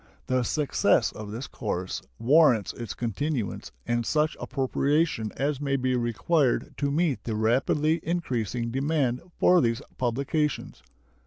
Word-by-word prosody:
The 130 0 +1
success 145 +4 +2
of 105 -1 -8
this 115 +5 -5
course 95 -4 -4 0.2
warrants 130 - +4
its 120 -2 -6
continuance 120 0 -3
and 120 0 0
such 155 +5 +1
appropriation 140 -3 0
as 140 0 -1
may 140 -1 0
be 130 -1 0
required 125 +4 +1
to 140 - 0
meet 150 -1 0
the 110 - -3
rapidly 135 +8 +2
increasing 120 - -2
demand 135 -2 0 0.2
for 180 -1 +5
these 115 -2 +1 0.2
publications. 140 +5 -1
130 Hz, 130 wpm, -27 LUFS, 115-150 Hz, 0.2 s, for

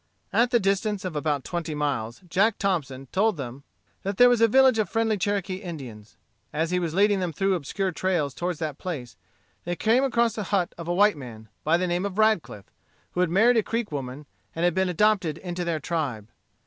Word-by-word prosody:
At 235 +2 +4
the 240 -1 +3
distance 200 0 0
of 180 -4 -4
about 145 -2 -1
twenty 170 -3 -4
miles, 130 -6 -2
Jack 200 +5 +2
Thompson 140 -9 -2
told 210 0 +2
them 130 -1 -6 0.4
that 195 0 -3
there 245 0 +8
was 240 -2 +2
a 230 - +7
village 260 0 +5
of 210 -5 0
friendly 225 -1 +1
Cherokee 195 -1 -1
Indians. 135 - -9 0.3
As 160 +3 -1
he 180 - +2
was 170 -2 -3
leading 200 0 +4
them 180 -2 -1
through 195 +5 +1
obscure 185 +4 -2
trails 170 -6 -1
toward 175 +1 -3
that 155 -3 -4
place, 140 -10 -5 0.5
they 175 +1 -2
came 230 +8 +3
across 235 -4 +2
the 210 -2 -4
hut 185 -3 0
of 170 -1 -8
a 175 - 0
white 205 -2 +4
man, 110 -5 -10
by 160 +2 +3
the 185 - 0
name 175 +1 -1
of 200 -1 -4
Radcliff, 215 - +1 0.5
who - - -4
had 180 -1 +3
married 225 +7 +4
a - - +5
Creek 230 -1 -3
woman, 140 0 -5 0.3
and 165 +2 0
had 175 - +3
been 190 +1 +1
adopted 185 -3 +2
into 175 -1 -4
their 170 -2 -1
tribe. 135 -11 -3
180 Hz, 210 wpm, -25 LUFS, 150-205 Hz, 0.5 s, there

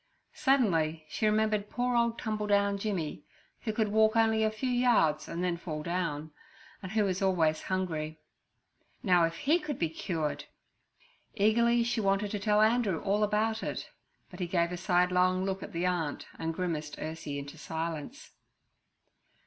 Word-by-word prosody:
Suddenly 165 - +2
she 215 - 0
remembered 215 -1 +1
poor 245 0 -1
old 235 0 +2
Tumbledown 205 -2 +1
Jimmy, 190 -7 -3 0.4
who 220 - -3
could 215 -1 0
walk 220 +1 +3
only 220 -1 +3
a 215 - +3
few 235 +4 -3
yards 235 -12 +3
and 170 +2 -3
then 175 -1 0
fall 155 -3 -5
down, 160 -3 -2 0.5
and 190 +1 -7
who 215 -1 +3
was 190 -1 -1
always 165 -5 +2
hungry. 160 -5 -3 0.8
Now, 180 -5 +5
if 165 0 -3
he 310 - +2
could 300 -5 -4
be 165 - 0
cured! 160 -2 -3 0.9
Eagerly 235 +3 +3
she 235 -1 0
wanted 200 0 +1
to 205 - -2
tell 210 +1 +3
Andrew 220 -6 +2
all 205 +2 +1
about 220 +2 +1
it, - - -5 0.4
but 180 - -11
he 180 - -1
gave 170 -1 +1
a - - -2
sidelong 180 0 +2
look 195 0 -2
at - - -7
the 170 +2 -2
aunt 170 -5 -1
and 165 0 -1
grimaced 160 -4 -3
Ursie 155 -2 -5
into 140 0 -8
silence. 165 - -5
190 Hz, 160 wpm, -30 LUFS, 165-220 Hz, 0.9 s, Now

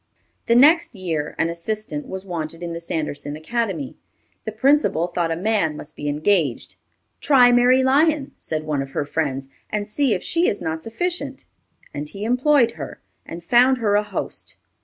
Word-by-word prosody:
The 235 - +4
next 295 +1 +5
year, 165 -6 -3
an 165 - +1
assistant 170 -3 -4
was 190 0 -6
wanted 165 -2 -5
in 170 -1 -4
the 165 - -5
Sanderson 150 -3 -4
Academy. 170 - -3 0.5
The 220 - -3
principal 260 - +2
thought 175 -1 -2
a 165 - 0
man 180 -5 0
must 150 - -9
be 145 - -4
engaged. 155 - 0 0.5
"Try 250 -4 +5
Mary 250 +2 +5
Lyon," 290 +2 +2
said 155 -1 -3
one 150 -3 -1
of 135 0 -7
her 145 - -1
friends, 140 -3 -2 0.2
"and 205 -1 -2
see 255 +2 +1
if 180 - -5
she 340 +1 +1
is 205 - 0
not 160 0 -3
sufficient," 350 - -4 0.5
and 145 +1 -5
he 200 +5 -7
employed 250 +1 +3
her, - - -8 0.3
and 170 +1 -8
found 250 +7 +4
her 215 -4 0
a 205 - +4
host. 210 -2 -6
195 Hz, 175 wpm, -22 LUFS, 160-245 Hz, 0.5 s, next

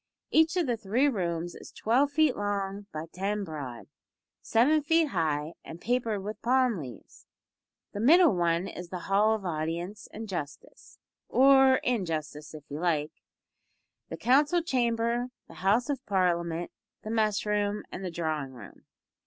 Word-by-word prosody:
Each 320 +3 +4
of 350 - +2
the 240 -3 -1
three 230 +7 +1
rooms 175 - -2
is - - -12
twelve 255 +6 +2
feet 295 -1 +2
long 200 -1 -3
by 155 +1 -5
ten 200 +2 -2
broad; 145 -9 -7 0.6
seven 290 +7 +3
feet 325 +1 +2
high, 155 - -1
and 165 - -9
papered 225 -2 -1
with 210 +1 -6
palm 250 -4 +2
leaves. 125 -8 -11 0.6
The 205 - -6
middle 325 - +6
one 170 +1 +1
is 175 0 -8
the 185 - -4
hall 210 +3 +3
of 205 -3 -7
Audience 170 +5 -4
and 220 +1 -7
Justice 150 -7 -7 0.3
or 265 0 +6
injustice 160 -9 -3
if 150 - -10
you 145 - -4
like 155 -3 0 1.0
the - - -6
Council 295 +7 +3
Chamber, 235 -3 0 0.2
the - - -13
House 210 +7 +2
of 275 -3 -3
Parliament, 175 -3 0 0.3
the 215 - -5
mess 215 -2 +1
room, 210 0 0
and 190 - -6
the 185 - -3
drawing 155 -5 -3
room. 120 - -13
205 Hz, 155 wpm, -28 LUFS, 170-245 Hz, 1.0 s, middle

